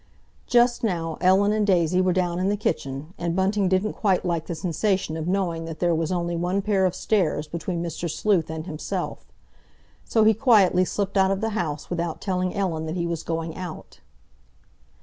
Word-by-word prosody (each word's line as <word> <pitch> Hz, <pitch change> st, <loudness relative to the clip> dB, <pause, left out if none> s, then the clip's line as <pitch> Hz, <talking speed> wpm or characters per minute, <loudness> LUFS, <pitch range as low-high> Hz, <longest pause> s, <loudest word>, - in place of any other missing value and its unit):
Just 240 Hz, 0 st, +3 dB
now 165 Hz, -6 st, -2 dB
Ellen 190 Hz, +3 st, +4 dB
and 215 Hz, -1 st, +1 dB
Daisy 180 Hz, -1 st, +3 dB
were 185 Hz, 0 st, +2 dB
down 175 Hz, -1 st, 0 dB
in 185 Hz, +2 st, +1 dB
the 205 Hz, -, 0 dB
kitchen, 155 Hz, -4 st, -3 dB
and 170 Hz, 0 st, -1 dB
Bunting 190 Hz, +1 st, +1 dB
didn't 190 Hz, +3 st, +1 dB
quite 190 Hz, -4 st, +1 dB
like 170 Hz, -2 st, -1 dB
the 170 Hz, -, -3 dB
sensation 180 Hz, +1 st, -1 dB
of 160 Hz, 0 st, -4 dB
knowing 175 Hz, -3 st, -1 dB
that 165 Hz, -1 st, -6 dB
there 175 Hz, 0 st, +1 dB
was 165 Hz, 0 st, -1 dB
only 175 Hz, -1 st, -1 dB
one 180 Hz, +3 st, -1 dB
pair 195 Hz, -2 st, +2 dB
of 180 Hz, -, -3 dB
stairs 160 Hz, -8 st, 0 dB
between 170 Hz, +2 st, -3 dB
Mr. 170 Hz, 0 st, -4 dB
Sleuth 175 Hz, -1 st, +1 dB
and 160 Hz, 0 st, -5 dB
himself. 160 Hz, -4 st, -5 dB, 0.8 s
So 220 Hz, -, +2 dB
he 220 Hz, +1 st, +6 dB
quietly 205 Hz, -6 st, +4 dB
slipped 200 Hz, +1 st, -2 dB
out 190 Hz, 0 st, +4 dB
of 195 Hz, 0 st, 0 dB
the 225 Hz, +1 st, -1 dB
house 160 Hz, -9 st, -3 dB
without 170 Hz, -2 st, -2 dB
telling 185 Hz, -2 st, -1 dB
Ellen 165 Hz, -5 st, -1 dB
that 160 Hz, -, -3 dB
he 170 Hz, -1 st, -1 dB
was 170 Hz, -2 st, -2 dB
going 165 Hz, -1 st, -3 dB
out. 180 Hz, -4 st, -8 dB
180 Hz, 190 wpm, -24 LUFS, 165-195 Hz, 0.8 s, he